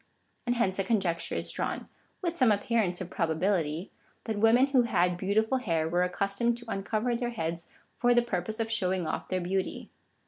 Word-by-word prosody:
And 245 - +2
hence 195 -5 +1
a - - +2
con 225 +1 +2
jecture 170 -3 -2
is - - -2
drawn, - - -3 0.4
with 345 -1 -1
some 255 -8 +4
appearance 205 -3 +1
of 185 -1 -6
probability 165 0 0 0.2
— - - -36
that 220 -2 -3
women 225 +4 +6
who 275 -2 +4
had 180 -6 +2
beautiful 220 +7 +1
hair 165 -9 0
were 175 +2 +1
accustomed 200 +6 0
to 240 - -9
uncover 215 +5 -1
their 240 0 -1
heads 170 -6 -4 0.3
for 245 0 +3
the 240 - +5
purpose 215 -1 -3
of 225 0 -1
showing 185 -4 +1
oif 155 - -3
their 185 -1 -1
beauty. 190 +2 -2
200 Hz, 195 wpm, -29 LUFS, 180-235 Hz, 0.4 s, women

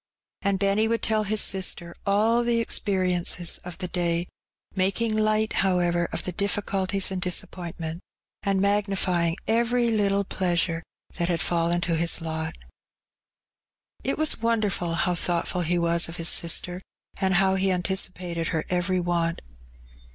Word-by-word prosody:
And 200 -2 +1
Benny 200 +3 +2
would 230 0 -1
tell 215 -1 +1
his 215 +1 +1
sister 180 -3 0
all 220 +4 +3
the 235 -1 +1
experiences 180 -5 0
of 180 -1 -8
the 185 - -4
day; 175 -1 0 0.5
making 205 +4 0
light, 215 0 +1
however, 175 -2 +1
of - - -2
the 180 - -3
dij£culties 195 0 0
and 185 -1 -3
disappointment, 170 -2 -3 0.4
and 195 -2 +1
magnifying 195 -4 +1
every 235 +1 +2
little 200 -2 +2
pleasure 175 -3 0 0.4
that 170 0 0
had 170 -2 +1
fallen 170 +1 +1
to 170 -1 0
his 170 +1 +2
lot. 160 -1 -4 1.5
It 270 - -1
was 310 -6 0
wonderful 210 -7 0
how 180 +1 +1
thoughtful 175 +1 -1
he 175 +1 0
was 170 0 +1
of 165 - -7
his 165 -2 +1
sister, 175 +2 +1 0.4
and 190 -1 +1
how 190 +1 +4
he 190 0 +1
anticipated 180 -2 -1
her 160 -1 -1
every 180 +1 +1
want. 170 -1 -1
185 Hz, 145 wpm, -25 LUFS, 170-200 Hz, 1.5 s, how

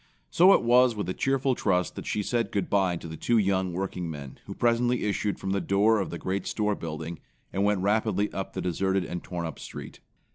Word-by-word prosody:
So 180 +3 +6
it - - +3
was 125 0 +5
with 105 -4 -3
a - - 0
cheerful 135 +2 +1
trust 90 -7 0
that - - -7
she 105 - -1
said 120 +2 -1
good 100 -3 -2
bye 95 -3 +2
to 85 - -7
the 80 - -7
two 120 +8 +1
young 95 -3 +1
workingmen 85 -6 -5
who - - -6
presently 120 +1 +2
issued 105 0 -1
from 95 - -4
the 100 0 0
door 100 +5 +3
of 95 - -2
the 85 - -5
great 95 +2 -3
store 105 -1 0
building, 80 -2 -6 0.3
and 100 - 0
went 100 -2 +2
rapidly 105 0 +1
up 95 - -4
the - - -3
deserted 95 +2 0
and 90 -1 -5
torn 85 -2 -4
up 80 - -6
street. - - -9
100 Hz, 220 wpm, -27 LUFS, 90-110 Hz, 0.3 s, So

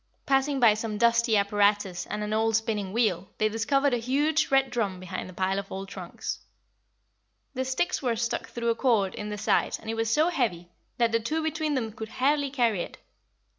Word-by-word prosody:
Passing 270 +1 +2
by 230 -4 +6
some 215 0 -3
dusty 235 0 +3
apparatus 200 -2 +1
and 210 0 -3
an 210 0 -2
old 225 0 +2
spinning 215 -4 -1
wheel, 200 -5 0
they 215 - +2
discovered 270 +5 +1
a - - +3
huge 290 +6 +1
red 270 -1 +3
drum 200 -6 -1
behind 185 0 -6
a - - -10
pile 190 +2 0
of 200 - -8
old 195 0 -5
trunks. - - -6 1.1
The 260 -1 -1
sticks 265 +8 -1
were 245 -4 0
stuck 230 +1 -2
through 235 -1 -2
a 230 - +2
cord 225 -7 +2
in 210 0 -5
the 210 - -4
side - - +1
and 220 - -5
it - - -3
was 225 0 0
so 305 +9 +3
heavy 215 - -1 0.3
that 235 -1 +2
the 230 - +2
two 310 +8 -2
between 315 -1 -1
them 225 -4 -2
could 220 0 -7
hardly 285 +3 +1
carry 235 -8 +1
it. - - -7
225 Hz, 205 wpm, -27 LUFS, 205-265 Hz, 1.1 s, by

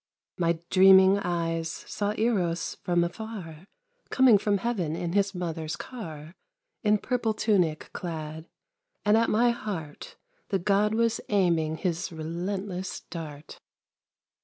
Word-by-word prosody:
My 170 -1 +2
dreaming 190 +1 +7
eyes 165 -3 -1
saw 205 +4 -3
Eros 185 -7 0
from 175 -1 +2
afar 175 -3 -7 0.4
Coming 255 -6 +6
from 205 0 +1
heaven 190 -7 -2
in 170 0 -3
his 200 -1 +1
mother's 165 -3 -3
car, 165 - -8 0.5
In 210 -1 +3
purple 235 -1 -1
tunic 185 -8 +1
clad; 160 -2 -6 0.6
and 210 +1 +5
at 230 +1 +3
my 235 +3 +4
heart 175 -10 -6 0.3
The 195 - +1
God 205 +3 +2
was 230 0 +1
aiming 170 -6 +2
his 175 +1 -2
relentless 180 +4 -4
dart. 155 -3 -8
185 Hz, 120 wpm, -27 LUFS, 165-210 Hz, 0.6 s, dreaming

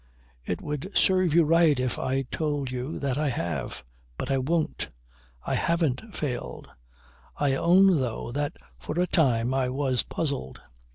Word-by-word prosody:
"It 90 +7 -4
would 150 +5 -4
serve 185 -4 +3
you 170 - +7
right 160 -3 +4
if 125 -1 -1
I 135 +1 0
told 145 -1 -2
you 130 +4 -4
that 140 -1 -1
I 150 -1 +1
have. 85 - -3 0.3
But - - -3
I 135 - +2
won't. 155 +4 -1 0.6
I - - -1
haven't 170 - 0
failed. 135 -5 -4 0.7
I 145 -2 +2
own 180 +4 +5
though 120 -2 -3
that 145 +3 -2 0.3
for 155 - -4
a 180 - +3
time, 130 -9 +2
I 130 -1 +1
was 130 -2 +1
puzzled. 140 - -4
140 Hz, 155 wpm, -27 LUFS, 130-165 Hz, 0.7 s, you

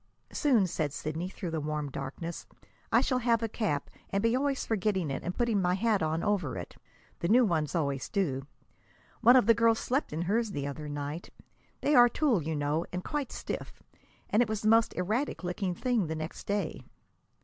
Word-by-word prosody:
"Soon," 250 -9 +3
said 155 -4 -2
Sidney, 155 +5 -3
through 180 -2 -5
the 160 -1 -2
warm 150 -1 -3
darkness, 140 +6 -6 0.4
"I - - +5
shall 255 -2 +1
have 230 -1 +2
a - - +1
cap, 205 -10 -1 0.2
and 195 +1 0
be 230 +1 +3
always 275 0 0
forgetting 190 -7 0
it - - -3
and 175 - -4
putting 235 -5 +2
my 180 0 +2
hat 210 0 +1
on 160 +1 0
over 195 - 0
it 90 - -7 0.4
the 170 - -1
new 245 +5 +5
ones 160 -4 0
always 140 -5 -1
do. 140 -9 -1 0.7
One 240 +2 +7
of 255 - +6
the 230 - +7
girls 230 0 +3
slept 265 +6 -1
in 160 +3 -2
hers 215 +3 0
the 140 -4 -3
other 150 +1 -5
night! 145 +3 -5 0.5
They 295 - +2
are 245 -3 +8
tulle, 255 - +2
you 160 +1 -2
know, 145 +3 0
and 180 0 -4
quite 295 -4 -3
stiff, - - -6 0.5
and 215 - +4
it 240 - +1
was 215 -1 -2
the 215 - +3
most 225 +1 +4
erratic 215 +7 -1
looking 180 +1 -2
thing 240 -4 0
the 160 - -3
next 155 +1 -6
day!" 200 -5 -1
185 Hz, 200 wpm, -30 LUFS, 155-230 Hz, 0.7 s, are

